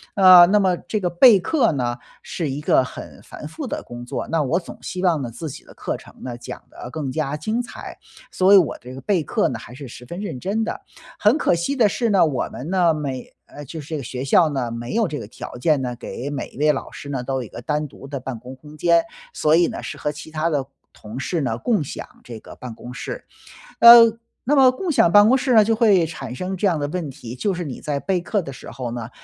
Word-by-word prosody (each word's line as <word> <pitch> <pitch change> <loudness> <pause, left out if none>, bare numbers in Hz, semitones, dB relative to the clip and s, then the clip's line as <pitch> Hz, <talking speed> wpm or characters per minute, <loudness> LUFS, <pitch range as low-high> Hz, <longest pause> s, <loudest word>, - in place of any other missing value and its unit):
啊， 185 -3 +9
那 205 +4 +3
么 190 -3 +2
这 215 +4 -4
个 185 - -1
备 195 +5 +6
课 245 - +2
呢， 120 -3 -1 0.3
是 165 -5 -4
一 135 +2 -4
个 150 - +3
很 130 - -10
繁 - - -10
复 - - -7
的 - - -4
工 120 0 -9
作， 120 - -5
那 165 -1 0
我 150 +5 +1
总 175 - -11
希 185 0 -5
望 170 -5 +2
呢， 125 - -4
自 155 +7 -7
己 - - -11
的 - - -17
课 - - -4
程 - - -16
呢， 125 -2 -5
讲 120 0 -9
得 120 - -9
更 140 -1 -4
加 150 0 -2
精 215 +10 -2
彩， 240 - -9 0.4
所 185 +1 +3
以 - - +10
我 170 -9 +2
这 125 +1 -10
个 135 - -9
备 185 +3 +1
课 150 - 0
呢 120 - -5
还 120 - -12
是 140 0 -9
十 125 - -11
分 170 +9 -8
认 195 -11 -5
真 205 - -1
的。 220 - -4 0.4
很 215 +7 +4
可 295 - +2
惜 170 +12 -1
的 235 -5 +4
是 230 +3 -1
呢， 195 -4 +4
我 140 -5 -1
们 140 +6 -7
呢 180 -3 +3
每 140 -4 -5
呃 145 - -10
就 160 +4 -8
是 145 - -10
这 160 - -2
个 140 - -6
学 125 +1 -5
校 160 +4 +4
呢， 130 -5 -2
没 120 - -5
有 225 -2 +2
这 150 -3 -5
个 - - -8
条 120 - -9
件 150 +2 +2
呢， 125 -1 -3
给 125 +2 -6
每 145 -2 -4
一 - - -17
位 150 +2 +4
老 - - -4
师 140 - -9
呢， 135 -3 -3
都 135 +1 -3
有 130 - -2
一 - - -9
个 - - -9
单 150 +3 -2
独 135 - -13
的 140 -1 -5
办 125 -2 -6
公 125 +3 -10
空 150 +3 -14
间。 170 +1 +3 0.3
所 155 +1 +3
以 170 +1 +4
呢， - - -6
是 - - -6
和 150 - -2
其 150 +1 -10
他 160 +1 -1
的 145 -4 -1 0.3
同 110 +4 -9
事 165 +4 -2
呢， 115 -5 -1
共 210 - 0
享 135 - -7 0.2
这 115 -2 -9
个 - - -13
办 125 -2 -8
公 120 +2 -10
室。 315 - -7 0.5
呃， 235 -1 +9 0.3
那 290 +5 +2
么 265 -2 +6
共 355 +8 -5
享 175 - +4
办 205 +3 +7
公 260 +4 +5
室 260 -1 0
呢， 215 -2 +7
就 225 +1 +2
会 205 -7 +4
产 135 -6 -7
生 185 +8 -4
这 195 +2 +1
样 170 -5 +1
的 145 - -2
问 160 0 -4
题。 120 -2 -9
就 195 +10 -1
是 175 -1 -4
你 135 -5 -7
在 145 -2 -2
备 185 +3 -1
课 205 +3 -1
的 140 -5 -8
时 - - -11
候 125 -3 -5
呢， 120 -1 -6
155 Hz, 285 characters per minute, -22 LUFS, 130-190 Hz, 0.5 s, 以